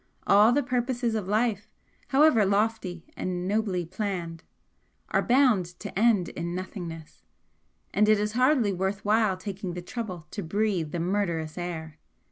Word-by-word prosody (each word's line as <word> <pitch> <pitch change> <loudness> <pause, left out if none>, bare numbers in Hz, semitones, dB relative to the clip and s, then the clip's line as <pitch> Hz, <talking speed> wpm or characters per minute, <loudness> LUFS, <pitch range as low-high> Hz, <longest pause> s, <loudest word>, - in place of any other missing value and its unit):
All 210 +3 +6
the 285 +3 +2
purposes 245 -1 -1
of 210 -4 -2
life, 215 0 0 0.4
however 275 -5 +5
lofty 200 -3 0
and 180 0 -3
nobly 200 -4 0
planned, 175 -3 -4 0.7
are - - +2
bound 245 -7 +3
to 205 - -7
end 215 -6 +3
in 170 0 -4
nothingness, 175 -4 -7 0.7
and 210 +2 +3
it 215 -1 +5
is 210 0 -1
hardly 250 -3 +3
worth 190 +2 -2
while 210 -2 +3
taking 190 -1 -5
the 180 - -4
trouble 185 -6 -6
to 205 - -4
breathe 190 -3 -1
the 170 - -3
murderous 170 -4 -1
air!" 160 -3 -6
200 Hz, 145 wpm, -27 LUFS, 175-220 Hz, 0.7 s, All